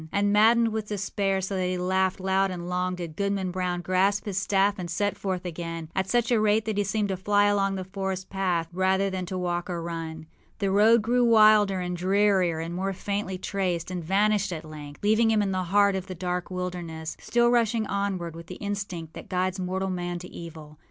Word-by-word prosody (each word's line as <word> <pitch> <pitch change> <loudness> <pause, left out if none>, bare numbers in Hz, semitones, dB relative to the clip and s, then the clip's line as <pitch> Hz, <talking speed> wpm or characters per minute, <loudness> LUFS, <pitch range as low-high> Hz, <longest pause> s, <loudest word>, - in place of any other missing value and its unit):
â 160 - -11
And, 205 0 +2
maddened 225 +2 +5
with 220 -1 -3
despair, 195 -1 -1
so 195 +1 -3
that 185 -1 0
he 180 0 -1
laughed 185 +1 0
loud 190 +1 +1
and 175 -1 -5
long, 180 0 -1
did 170 -3 -7
Goodman 200 -1 -1
Brown 180 -1 -2
grasp 190 +3 +1
his 195 -2 -1
staff 200 +2 +2
and 175 -1 -5
set 205 +4 0
forth 185 -2 -3
again, 165 -1 -5
at 190 0 -1
such 240 +1 +1
a 235 - +4
rate 215 +1 +2
that 215 -2 -1
he - - +3
seemed 205 +1 -1
to 190 - 0
fly 205 +2 +3
along 200 -1 +2
the 190 - -3
forest 190 0 -4
path 180 -4 0
rather 190 +1 +1
than 185 -1 -4
to 185 - -4
walk 175 -1 -2
or 175 -1 -2
run. 165 -1 -5 0.3
The 200 -2 0
road 215 +3 +5
grew 245 +2 +2
wilder 215 -4 +5
and 180 0 -3
drearier 190 -2 +2
and 165 +1 -4
more 190 +2 -2
faintly 200 0 -3
traced, 185 -3 -2
and 180 -2 -4
vanished 200 +3 +2
at 160 -2 -5
length, 150 0 -10
leaving 220 +2 +4
him 215 -2 +3
in 195 - -1
the 185 -1 -1
heart 200 +2 +3
of 190 0 -4
the 185 - -6
dark 180 +1 -3
wilderness, 175 -3 -5
still 240 0 +2
rushing 230 -2 +2
onward 195 -5 -2
with 165 0 -10
the - - -7
instinct 200 -6 -5
that - - -10
guides 185 +1 -1
mortal 190 +1 -2
man 175 -1 -3
to 180 +1 -8
evil. 155 -3 -10
190 Hz, 220 wpm, -26 LUFS, 180-205 Hz, 0.3 s, maddened